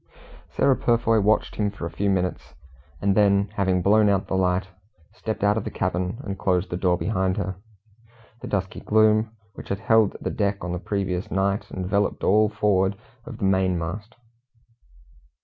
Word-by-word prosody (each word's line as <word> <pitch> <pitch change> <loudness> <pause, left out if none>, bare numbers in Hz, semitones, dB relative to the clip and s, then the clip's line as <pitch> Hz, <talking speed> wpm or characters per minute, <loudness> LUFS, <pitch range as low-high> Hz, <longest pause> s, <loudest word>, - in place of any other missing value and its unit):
Sarah 135 -1 +4
Purfoy 115 -2 +2
watched 105 +2 +1
him 105 -1 +1
for 100 -4 -7
a 85 - -5
few 100 +5 -1
minutes, 90 -2 -2 0.5
and 100 0 +3
then 100 -1 +3
having 95 -3 0
blown 105 +2 +4
out 100 -1 +1
the - - -5
light, 95 0 +1 0.5
stepped 110 -2 -5
out 105 +1 +3
of 110 - -2
the - - -4
cabin, 90 +2 -2
and 100 -2 -5
closed 90 0 0
the - - -1
door 90 -1 +1
behind 95 -2 -1
her. 95 -2 -3 0.8
The - - -6
dusky 95 -2 -3
gloom 110 +1 +3 0.2
which - - -11
had 100 +1 -3
held 110 -3 +3
the - - -3
deck 100 -1 -1
on 90 - -3
the 90 - -3
previous 95 -2 -3
night 100 +1 -1
enveloped 100 +2 -1
all 105 +2 +4
forward 100 -2 +1 0.3
of - - -8
the 100 - -2
main 95 -1 +2
mast. 100 +8 -6
100 Hz, 175 wpm, -24 LUFS, 95-105 Hz, 0.8 s, Sarah